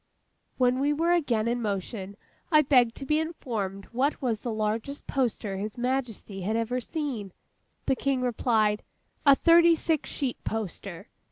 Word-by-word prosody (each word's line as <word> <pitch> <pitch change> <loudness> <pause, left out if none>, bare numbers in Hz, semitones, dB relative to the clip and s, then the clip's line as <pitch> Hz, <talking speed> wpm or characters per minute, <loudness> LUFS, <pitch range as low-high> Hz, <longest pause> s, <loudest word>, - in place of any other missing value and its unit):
When 250 0 +3
we 285 +2 +2
were 330 +3 +1
again 245 -11 +2
in 240 +1 0
motion, 200 -1 -4 0.3
I 305 -1 +6
begged 250 -4 +4
to 275 - -7
be 300 +3 +2
informed 225 - -4
what 265 +5 0
was 235 -6 -1
the 240 - -4
largest 220 +6 -2
poster 225 -7 -1
His 210 +4 -5
Majesty 245 -6 -2
had 210 +5 -1
ever 235 +2 -1
seen. 245 - -4 0.5
The 265 - +2
King 270 -1 0
replied, 220 -3 +1 0.5
'A 280 - +9
thirty 335 +2 +6
six 320 -2 -1
sheet 265 -4 -3
poster. 200 -2 -5
245 Hz, 155 wpm, -27 LUFS, 215-280 Hz, 0.5 s, A